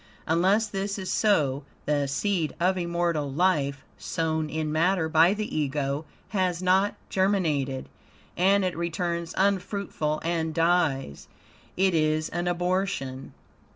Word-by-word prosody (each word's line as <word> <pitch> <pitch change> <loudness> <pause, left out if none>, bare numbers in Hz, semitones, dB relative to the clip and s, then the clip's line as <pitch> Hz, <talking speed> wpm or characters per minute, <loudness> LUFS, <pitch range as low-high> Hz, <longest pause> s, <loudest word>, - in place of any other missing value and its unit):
Unless 190 +7 +3
this 195 0 -3
is 190 -2 -4
so, 150 -10 +2 0.2
the 145 -1 +1
seed 165 +3 -1
of 185 +2 +2
immortal 170 -4 -1
life, 145 -4 +1
sown 160 -1 -1
in 155 -1 -2
matter 165 +2 +2
by 165 +5 +4
the 215 0 -4
Ego, 145 0 -1 0.2
has 185 -4 0
not 185 +2 +2 0.2
germinated, 160 -9 0 0.5
and 195 +2 +3
it 180 - -1
returns 170 0 -2
unfruitful 190 -5 0
and 165 -1 -1
dies 165 - +1 0.5
it 190 0 +3
is 155 -1 +1
an 175 +1 -2
abortion. 175 -7 -2
170 Hz, 120 wpm, -26 LUFS, 155-185 Hz, 0.5 s, by